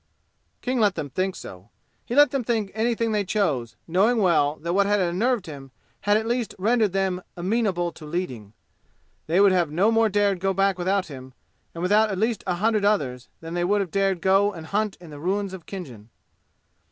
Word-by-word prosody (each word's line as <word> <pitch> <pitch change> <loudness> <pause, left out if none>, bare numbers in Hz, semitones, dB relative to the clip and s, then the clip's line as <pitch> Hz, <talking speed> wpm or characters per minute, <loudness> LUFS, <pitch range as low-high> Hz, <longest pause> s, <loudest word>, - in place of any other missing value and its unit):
King 255 0 -1
let 205 -3 +3
them 145 -4 -5
think 185 +3 -1
so. 95 +3 -11 0.4
He 240 - -4
let 290 +1 +6
them 275 -3 -1
think 220 -4 -1
anything 230 +1 0
they 210 -1 +1
chose, 155 - -1
knowing 200 +8 +2
well 165 -7 +3
that 170 +3 -4
what 200 +1 +3
had 205 0 +2
unnerved 195 +5 0
him 140 -4 -9 0.4
had 205 - +6
at 220 - -2
least 240 0 -2
rendered 215 +1 +2
them 190 -1 -1 0.2
amenable 185 -2 0
to 160 - -14
leading. 130 - -5 0.7
They 170 +4 +2
would 200 -1 +6
have 175 -4 +2
no 185 +9 +2
more 225 -1 +3
dared 205 -2 +1
go 195 +1 0
back 195 -1 +1
without 190 +2 +1
him, 130 -4 -11 0.4
and 170 - -5
without 210 +4 +3
at 195 - -3
least 220 +2 0
a 180 - 0
hundred 215 +2 +1
others, 140 -12 0
than 165 0 -7
they 175 0 -1
would 205 +4 +2
have 190 -5 -3
dared 195 -3 0
go 195 +2 +3
and 165 -5 -9
hunt 210 +3 -1
in 170 -3 -13
the 145 - -9
ruins 195 +4 -2
of 185 -4 -10
Khinjan. 125 - -9
195 Hz, 200 wpm, -24 LUFS, 170-210 Hz, 0.7 s, let